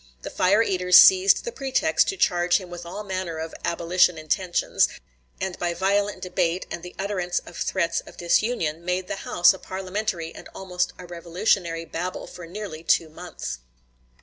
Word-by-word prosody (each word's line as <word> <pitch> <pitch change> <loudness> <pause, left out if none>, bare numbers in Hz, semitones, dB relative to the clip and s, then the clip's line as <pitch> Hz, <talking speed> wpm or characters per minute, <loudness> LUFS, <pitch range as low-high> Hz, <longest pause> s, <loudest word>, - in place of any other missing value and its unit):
The - - -6
fire 205 +5 +3
eaters 180 -3 +4
seized 380 +1 +7
the 475 - -3
pretext 280 - +1
to 390 - -2
charge 175 - +3
him 185 -3 -9
with 175 -1 -8
all 205 +5 -6
manner 185 -4 -4
of 160 0 -5
"abolition" 170 +1 +2
intentions, 175 +3 +1 0.5
and 190 -1 -4
by 175 -1 -1
violent 200 +1 0
debate 180 -1 -1
and 170 - -5
the 180 +1 -10
utterance 190 -3 -2
of 175 - -12
threats 170 -2 0
of - - -13
disunion 170 -3 0
made 180 +1 -2
the - - -4
House 175 +2 +5
a 190 - -10
parliamentary 185 -3 -4
and - - -11
almost 180 -2 -2
a 180 - -10
revolutionary 170 0 -1
babel 180 +3 -5
for 170 -2 -10
nearly 180 -3 -7
two 165 -1 +2
months. 155 - -7
180 Hz, 170 wpm, -24 LUFS, 170-195 Hz, 0.5 s, seized